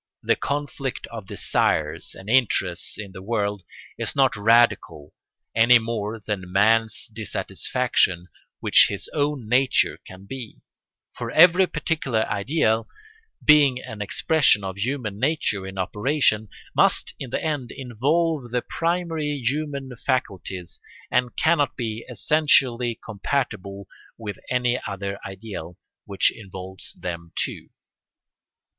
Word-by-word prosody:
The - - +3
conflict 140 -2 -3
of 110 -4 -8
desires - - 0
and 95 - -12
interests 100 -8 +2
in 105 -2 -7
the 95 - -10
world 105 -1 -1 0.4
is - - -2
not 135 -2 +3
radical 105 -9 +2 0.4
any 120 +2 +7
more 110 -1 -3
than 100 -4 -5
man's 110 +2 +3
dissatisfaction 95 -4 0 0.3
with - - -5
his 100 - -4
own 145 -5 -1
nature 125 +3 +2
can 95 +1 -12
be; 125 0 -8 0.5
for - - -5
every 180 +3 +6
particular 145 -9 -1
ideal, 110 0 +1 0.6
being 145 -4 +6
an 110 -5 -8
expression 135 0 +3
of 95 -1 -4
human 110 -1 -3
nature 120 -8 0
in 95 0 -8
operation, 110 - +1 0.3
must - - +3
in 130 - -6
the - - -1
end 145 -6 -2
involve 140 +3 -1
the 125 +1 -1
primary 165 -3 -1
human 140 -1 -2
faculties 95 -9 -3 0.3
and 125 -1 +1
cannot 155 -4 +2
be 115 -2 -3
essentially 125 -3 +2
incompatible 100 -4 -3 0.3
with 105 -3 -6
any 125 0 +1
other 100 0 -4
ideal 95 -4 -8 0.3
which 100 -1 +2
involves 95 -2 -5
them 85 -2 -7
too. - - -3
115 Hz, 120 wpm, -24 LUFS, 100-140 Hz, 0.6 s, any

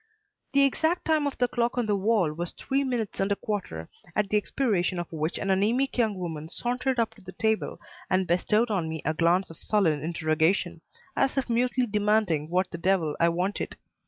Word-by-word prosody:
The 280 0 +5
exact 320 +5 +1
time 315 -2 +2
by 285 - -1
the 245 - +2
clock 240 0 -1
on 245 - +1
the 210 -1 +1
wall 200 -5 +2
was 170 +2 -4
three 275 +1 -1
minutes 245 -6 -2
and 195 +1 +1
a - - +3
quarter, 190 - -4 0.3
at 210 -2 +1
the 210 - +3
expiration 200 -5 0
of 175 -1 -4
which 160 0 -2
an 195 - -1
anaemic 230 +8 +1
young 220 -5 +1
woman 160 -3 -5
sauntered 250 +4 -1
up 225 -1 +1
to 220 - -18
the 185 0 -10
table 220 -1 -1 0.3
and 185 0 +2
bestowed 210 +7 +2
on 175 -6 0
me 160 -1 -5
a 155 - +1
glance 170 +3 +2
of 165 - -13
sullen 170 -9 +2
interrogation, 160 +3 0 0.3
as 270 - +1
if 260 -3 0
mutely 250 +2 +2
demanding 210 -8 +1
what 185 +2 0
the 170 - -6
devil 170 -4 +1
I 170 - +4
wanted. 180 +4 -2
200 Hz, 200 wpm, -27 LUFS, 170-235 Hz, 0.3 s, The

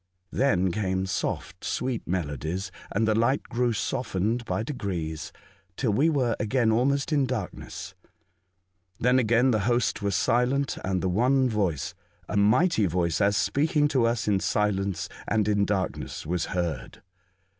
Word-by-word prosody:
Then 95 -9 +2
came 95 -1 -1
soft, 95 - -3
sweet 125 -2 -2
melodies, 85 - -3 0.2
and 115 - +1
the 110 - +3
light 115 +5 +2
grew 120 0 0
softened 115 -1 -1
by 110 - -1
degrees 85 - -4 0.5
till 115 -6 +1
we 145 +9 +3
were 130 -7 +1
again 115 +1 +2
almost 135 +6 +1
in 140 -3 +2
darkness. 115 -7 -5 1.1
Then 125 +2 +4
again 120 +2 +3
the 110 - +2
host 120 -2 +1
were 100 - 0
silent, 125 +7 +1
and 95 -1 -1
one 125 +8 +3
voice 100 - -1 0.2
— - - -35
a - - -4
mighty 110 - +3
voice, 85 +1 0
as 100 0 +3
speaking 150 +1 +2
to 130 -5 +2
us 115 -2 -1
in 100 -2 +3
silence 95 -4 0 0.2
and 105 -1 +1
in 105 -1 +2
darkness, 100 -2 -3
was 85 0 -1
heard. 85 -7 -4
110 Hz, 145 wpm, -26 LUFS, 95-125 Hz, 1.1 s, Then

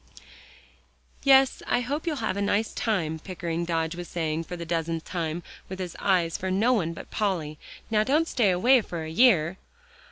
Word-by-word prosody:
"Yes, 270 -1 +5
I 245 - +2
hope 285 +7 -3
you'll 320 - 0
have - - -1
a 200 - -2
nice 205 +2 0
time," 165 -8 -1
Pickering 170 -1 -4
Dodge 165 -1 -1
was 175 0 -7
saying 160 -1 -2
for 180 +2 -6
the 170 - -6
dozenth 165 -1 -2
time, 170 -1 -3 0.3
with 190 0 -6 0.2
eyes 175 -4 +1
for 190 - -3
no 215 +7 +3
one 170 -8 0
but - - -10
Polly, 170 -8 -2 0.3
"now 215 -1 +3
don't 300 +7 +2
stay 230 -10 +2
away 240 +8 +4
for 170 -5 -6
a 160 - -6
year." 185 -4 +4
180 Hz, 180 wpm, -26 LUFS, 165-220 Hz, 0.3 s, Yes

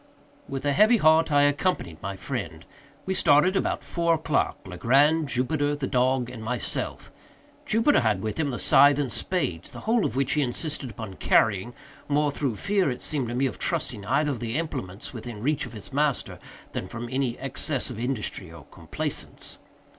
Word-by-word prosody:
With 135 0 -4
a 145 - +2
heavy 215 - +5
heart 160 -3 +4
I 145 0 +5
accompanied 145 - 0
my 100 +1 -4
friend. 95 - -5 0.4
We 190 - -1
started 165 +2 +4
about - - -1
four 170 -1 +1
o'clock—Legrand, 145 - +1
Jupiter, 145 +3 0
the 145 -2 -3
dog, 130 -1 +1
and 120 -3 -8
myself. 120 0 -3 0.6
Jupiter 230 +7 +3
had 105 -5 0
with 110 +7 -3
him 150 -3 +1
the 125 - -3
scythe 145 0 +6
and 140 -4 -1
spades—the 95 - -2
whole 225 -1 +2
of 110 - -2
which 135 0 +1
he 150 - +2
insisted 140 +1 -1
upon 110 -5 -8
carrying—more 120 +8 0
through 140 -5 -2
fear, 195 - +1
it 125 - -3
seemed 140 -5 0
to 120 - -4
me, 135 +2 +1
of 130 - -3
trusting 140 -11 -1
either 145 +6 +1
of 130 - -4
the 115 +2 -3
implements 105 - -5
within 115 -2 -7
reach 145 -1 0
of 120 - -12
his 110 +4 -8
master, 145 -1 0 0.3
than 90 - -4
from 120 +3 -6
any 130 -2 -1
excess 135 0 0
of 115 - -7
industry 115 -7 -3
or 85 -4 -12
complaisance. - - -6
135 Hz, 175 wpm, -26 LUFS, 115-150 Hz, 0.6 s, scythe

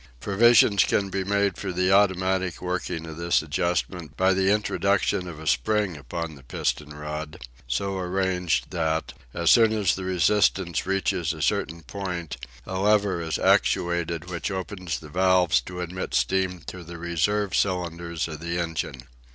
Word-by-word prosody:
Provision 105 - +5
can 100 0 +2
be 95 0 -1
made 100 -1 0
for 95 - -3
the 90 +1 +1
automatic 95 -2 +2
working 90 -2 -3
of 80 -1 -8
this 85 -1 +1
adjustment 85 +1 -2
by 95 +1 +4
the 95 +1 +2
introduction 100 -2 +1
of 80 -3 -8
a 80 - -9
spring 90 - +1
upon 80 +4 -5
the 70 - -14
piston 70 +3 -2
rod, 75 +2 -6 0.3
so 95 +11 -1
arranged 90 -1 0
that, 80 -3 -1 0.2
as 85 0 +3
soon 115 -2 +6
as 105 -5 +2
the 95 - -4
resistance 95 -2 +1
reaches 95 -3 0
a 80 - -8
certain 80 +1 -1
point, 90 -5 -5 0.3
a 95 0 -4
lever 100 -3 +2
is 80 -1 -2
actuated 85 -1 +1
which 90 +3 -3
opens 95 -3 -4
the 75 - -11
valves 90 +1 +3
to 90 0 -7
admit 90 +1 -4
steam 95 -2 +1
to 90 +2 -8
the 85 +1 -9
reserve 90 +4 0
cylinders 85 -3 -1
of 80 -2 -7
the 85 +1 -3
engine. 80 -7 -3
90 Hz, 160 wpm, -25 LUFS, 85-95 Hz, 0.3 s, soon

